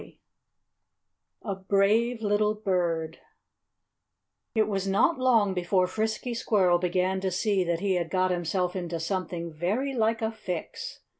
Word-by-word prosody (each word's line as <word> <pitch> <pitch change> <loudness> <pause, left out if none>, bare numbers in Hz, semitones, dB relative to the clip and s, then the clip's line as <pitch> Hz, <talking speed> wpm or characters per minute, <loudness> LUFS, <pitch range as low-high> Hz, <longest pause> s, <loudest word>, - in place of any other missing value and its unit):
VII - - -16 1.2
A 200 - -2
Brave 205 +5 +1
Little 210 +1 +2
Bird 170 -6 -1 1.4
It 220 -1 +3
was 195 -2 -2
not 205 +11 +2
long 230 -6 +3
before 180 +1 +1
Frisky 220 +5 -2
Squirrel 190 -7 +2
began 185 +1 0
to 190 - 0
see 195 +1 +1
that 170 0 -1
he 200 -1 +1
had 175 -2 -1
got 185 0 +1
himself 180 +1 -1
into 175 -2 -3
something 170 -1 -3
very 210 - -1
like 225 -1 +1
a 220 - 0
fix. 185 -6 -6
190 Hz, 140 wpm, -27 LUFS, 180-215 Hz, 1.4 s, It